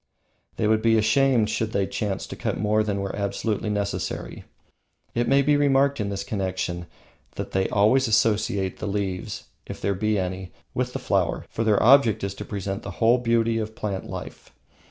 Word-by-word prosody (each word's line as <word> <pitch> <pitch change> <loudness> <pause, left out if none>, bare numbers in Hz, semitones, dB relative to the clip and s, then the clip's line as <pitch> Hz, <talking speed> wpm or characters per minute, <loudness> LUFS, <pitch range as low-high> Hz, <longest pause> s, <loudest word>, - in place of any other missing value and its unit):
They 110 - -1
would 110 0 +3
be 115 0 +4
ashamed 110 0 +3
should 110 0 -2
they 100 - +1
chance 100 -1 -3
to - - -8
cut - - -2
more 105 +2 +2
than 100 -2 -1
were 100 - -3
absolutely 105 +2 -2
necessary. 100 -5 -3 0.7
It 120 0 0
may 140 0 +4
be 145 +1 +3
remarked 140 -1 +3
in 100 -1 -1
this 100 0 -3
connection 95 -4 -3 0.5
that 100 0 -5
they 95 -1 0
always 115 +6 +3
associate 105 -3 +1
the - - -4
leaves, 100 -2 -3 0.2
if - - -7
there 100 - 0
be 105 +2 0
any, 95 0 -3 0.2
with - - -2
the - - -2
flower, - - 0
for 115 - -1
the 110 -2 +3
object 120 -4 +5
is 100 -1 -2
to - - -7
present 100 -1 -4
the - - -7
whole 120 +2 +4
beauty 115 -1 +1
of 110 0 -5
plant 100 -3 -4
life. - - -8
105 Hz, 185 wpm, -24 LUFS, 100-115 Hz, 0.7 s, object